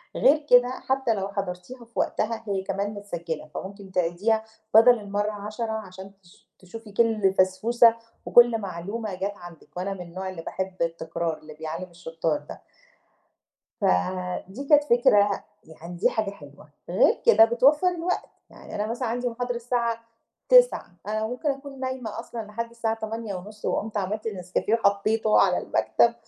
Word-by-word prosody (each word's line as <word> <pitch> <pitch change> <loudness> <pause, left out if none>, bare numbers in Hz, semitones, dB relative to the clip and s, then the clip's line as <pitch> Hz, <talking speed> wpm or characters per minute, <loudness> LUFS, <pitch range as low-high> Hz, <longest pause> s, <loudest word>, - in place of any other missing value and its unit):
غير 300 +1 +4
كده 245 0 +7
حتّى 260 -1 0
لو 195 -2 -2
حضرتيها 200 +5 -6
في 230 - -29
وقتها 230 +1 -1
هي 195 -2 -1
كمان 195 +1 -2
متسجِّلة، 170 -6 -5
فممكن 195 0 -8
تعيديها 190 +6 +1 0.3
بَدَل 230 +1 +7
المّرة 205 +1 -2
10 215 +2 -5
عشان 190 -3 -7
تش 175 - -22
تشوفي 210 +3 -11
كل 215 -3 +2
فَسْفوسَة، 225 +5 +4 0.3
وكل 240 -1 +6
معلومة 200 +1 -5
جات 200 +2 -3
عندك 175 0 -13
وأنا 195 +2 -2
من 185 - -8
النوع 185 +2 -6
اللي 180 -3 -7
باحب 190 +2 -4
التكرار 165 -1 -2
اللي 155 0 -12
بيعلِّم 160 +4 -6
الشُطّار 165 -2 -2
ده. 145 - -11 1.2
فدي 185 - -1
كانت 295 -1 +6
فكرة 205 -6 +3 0.2
يعني 170 +2 -10
دي 170 - +3
حاجة 215 -3 -1
حلوة، 145 -5 -15 0.2
غير 185 - +3
كده 220 +2 +8
بتوفَّر 275 +9 +4
الوقت. 355 0 -2 0.2
يعني - - -12
أنا 210 +1 -1
مثلًا 240 +1 -2
عندي 245 +2 -1
محاضرة 245 +1 -3
الساعة 235 -1 -1 0.5
09:00، - - +5
أنا 215 +1 -1
ممكن 250 +6 -2
أكون 275 -1 -7
نايمة 255 -4 -4
أصلًا 235 -1 -7
لحد 230 +2 -5
الساعة 230 -1 -1
08:30 215 -2 -6
وقُمت 220 0 -2
عملت 210 +3 -2
نسكافيه 185 +1 -1
وحطّيته 215 0 +2
على - - +3
المكتب - - +2
210 Hz, 150 wpm, -25 LUFS, 185-235 Hz, 1.2 s, كده